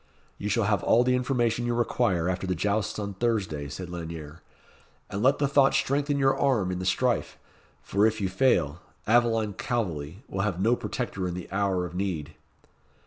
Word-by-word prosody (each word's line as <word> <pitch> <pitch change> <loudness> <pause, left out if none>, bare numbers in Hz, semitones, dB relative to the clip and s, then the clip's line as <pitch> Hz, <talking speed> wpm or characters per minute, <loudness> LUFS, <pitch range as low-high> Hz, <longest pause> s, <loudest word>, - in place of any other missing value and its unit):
"You 105 - -3
shall 115 +2 +2
have 100 -3 +1
all 120 - +4
the 125 +1 +2
information 120 -2 0
you 120 - 0
require 95 -7 +1
after 95 +1 -2
the 90 - 0
jousts 105 +4 -1
on 100 -1 -4
Thursday," 95 -10 -1
said 90 +5 -6
Lanyere; 80 -2 -7 0.7
"and 100 - -3
let 135 +4 +4
the 140 - +1
thought 135 -1 +4
strengthen 145 +1 +1
your 135 -1 +3
arm 120 -10 +1
in 90 - -3
the 90 - -3
strife, 125 +5 0 0.5
for 100 +2 +3
if 110 0 -1
you 100 - 0
fail, 90 - +1 0.3
Aveline 115 -2 +3
Calveley 95 - -3
will 95 - -3
have 100 -3 -1
no 115 +5 +3
protector 105 -4 -3
in 90 - -4
the 90 - -6
hour 95 -2 0
of 85 - -8
need." 90 -5 -3
100 Hz, 185 wpm, -27 LUFS, 90-120 Hz, 0.7 s, all